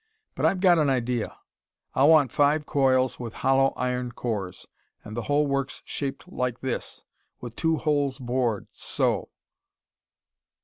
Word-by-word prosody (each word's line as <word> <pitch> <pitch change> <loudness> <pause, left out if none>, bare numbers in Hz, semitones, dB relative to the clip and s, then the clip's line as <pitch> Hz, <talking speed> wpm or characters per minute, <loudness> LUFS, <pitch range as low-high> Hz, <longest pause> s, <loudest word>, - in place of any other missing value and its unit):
But - - +1
I've 185 - 0
got 180 -3 +5
an 150 -2 +3
idea. 125 -3 -1 0.6
I'll 140 +3 +4
want 150 -6 +5
five 150 +1 +2
coils 130 -3 +2
with 115 -2 -6
hollow 135 0 +5
iron 125 -1 -2
cores, 105 -8 -4 0.4
and 110 - -8
the 120 - -2
whole 145 +1 +3
works 140 -1 -2
shaped 140 +3 -5
like 125 -8 -3
this, 130 -2 -4 0.4
with 120 -2 -8
two 160 -1 +1
holes 145 -4 0
bored 120 -4 -1
so...." - - -1
130 Hz, 140 wpm, -26 LUFS, 125-145 Hz, 0.6 s, got